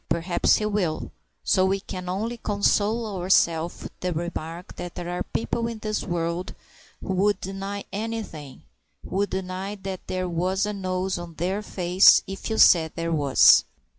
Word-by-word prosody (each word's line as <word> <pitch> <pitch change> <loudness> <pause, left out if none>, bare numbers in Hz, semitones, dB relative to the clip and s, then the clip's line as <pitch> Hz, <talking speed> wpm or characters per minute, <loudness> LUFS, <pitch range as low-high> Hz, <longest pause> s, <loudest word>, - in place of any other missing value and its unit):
Perhaps 170 +1 +2
he 210 - -1
will, 195 -7 -1 0.3
so 185 - +3
we 195 +1 +1
can 185 -2 -7
only 220 +6 -2
console 210 +1 +1 0.2
ourself 170 -2 +2
with - - -10
the 180 - -2
remark 170 +1 -5
that 175 -1 -7
there 175 -1 -5
are 180 - -3
people 230 +1 -2
in 230 -1 -5
this 215 0 -3
world 175 +1 -3 0.5
who 190 - -3
would 205 +2 +2
deny 195 +1 -5
anything 205 -10 -5 0.4
who - - -4
would 200 +1 +1
deny 190 +2 -4
that 190 -2 -7
there 185 0 -2
was 180 +3 0
a 210 - -3
nose 185 -1 -2
on 170 -1 -9
their 185 +6 -1
face 185 -2 +5
if 195 +3 -6
you 220 - -1
said 160 -3 +6
there 165 0 -2
was! 145 -4 +6
185 Hz, 165 wpm, -25 LUFS, 175-200 Hz, 0.5 s, said